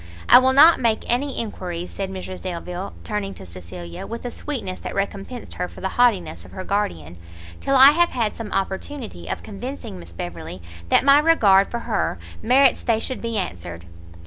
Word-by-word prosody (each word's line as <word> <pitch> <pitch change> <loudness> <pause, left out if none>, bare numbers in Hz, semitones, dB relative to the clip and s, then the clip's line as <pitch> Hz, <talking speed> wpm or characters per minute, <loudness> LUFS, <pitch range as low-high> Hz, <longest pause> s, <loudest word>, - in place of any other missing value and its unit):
"I - - +9
will 260 0 +3
not 310 +5 +8
make 230 -3 +1
any 270 +3 0
enquiries," 180 -6 -5
said 195 -1 -4
Mrs 185 -1 -7
Delvile, 180 +1 -5
turning 205 -2 -3
to - - -10
Cecilia 85 -1 -9
with 230 +2 -7
a 245 - -3
sweetness 240 -12 -5
that - - -6
recompensed 200 +4 -4
her 180 - -3
for - - -13
the 190 - -2
haughtiness 190 - +2
of 90 - -15
her 185 - -6
guardian, 85 - -2 0.4
"till 275 - 0
I 270 +2 +9
have 345 +3 +3
had 230 -4 -1
some 225 -3 -7
opportunity 205 +7 -4
of - - -4
convincing 215 - -7
Miss 85 -1 -12
Beverley, 85 0 -7 0.3
that - - +4
my 280 +1 +7
regard 210 -12 +5
for 235 - -4
her 215 - -1 0.2
merits 265 +2 +4
they 225 -2 +1
should 255 +3 -4
be 230 -1 -2
answered." 85 - -5
200 Hz, 185 wpm, -22 LUFS, 175-245 Hz, 0.4 s, I